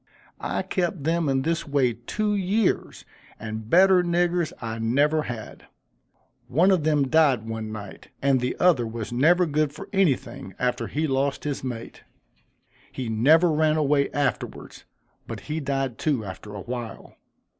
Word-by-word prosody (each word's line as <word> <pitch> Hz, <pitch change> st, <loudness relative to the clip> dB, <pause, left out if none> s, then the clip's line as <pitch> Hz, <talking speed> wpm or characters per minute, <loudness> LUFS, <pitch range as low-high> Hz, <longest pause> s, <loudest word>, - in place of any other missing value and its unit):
I -, -, -2 dB
kept 175 Hz, -4 st, -2 dB
them 165 Hz, 0 st, +1 dB
in 135 Hz, -1 st, +1 dB
this 165 Hz, +2 st, -1 dB
way 135 Hz, -4 st, +2 dB
two 210 Hz, -, -2 dB
years, 200 Hz, +2 st, 0 dB, 0.3 s
and 110 Hz, 0 st, -6 dB
better 185 Hz, +2 st, +6 dB
niggers 175 Hz, -1 st, +1 dB
I 115 Hz, -1 st, -5 dB
never 145 Hz, +7 st, +2 dB
had. 120 Hz, -6 st, -8 dB, 0.8 s
One 175 Hz, +9 st, +3 dB
of 180 Hz, -5 st, +2 dB
them 150 Hz, -3 st, +2 dB
died 135 Hz, -7 st, +3 dB
one 110 Hz, -1 st, -5 dB
night, 100 Hz, -3 st, -9 dB
and 135 Hz, -1 st, +2 dB
the 125 Hz, 0 st, -2 dB
other 155 Hz, -10 st, +3 dB
was 115 Hz, 0 st, -6 dB
never 170 Hz, +8 st, +4 dB
good 155 Hz, -2 st, 0 dB
for -, -, -10 dB
anything 135 Hz, -, 0 dB
after 125 Hz, 0 st, -1 dB
he 155 Hz, +2 st, -1 dB
lost 135 Hz, -1 st, -1 dB
his 145 Hz, -3 st, -3 dB
mate. 120 Hz, -3 st, -6 dB, 0.9 s
He 125 Hz, -3 st, -5 dB
never 155 Hz, +10 st, +4 dB
ran 155 Hz, 0 st, +2 dB
away 145 Hz, -2 st, +2 dB
afterwards, 140 Hz, -5 st, -3 dB, 0.4 s
but -, -, -6 dB
he 155 Hz, +1 st, -4 dB
died 135 Hz, -4 st, -2 dB
too, 135 Hz, -9 st, 0 dB
after 100 Hz, +2 st, -8 dB
a 100 Hz, -, -6 dB
while." 120 Hz, 0 st, -7 dB
140 Hz, 155 wpm, -25 LUFS, 120-160 Hz, 0.9 s, better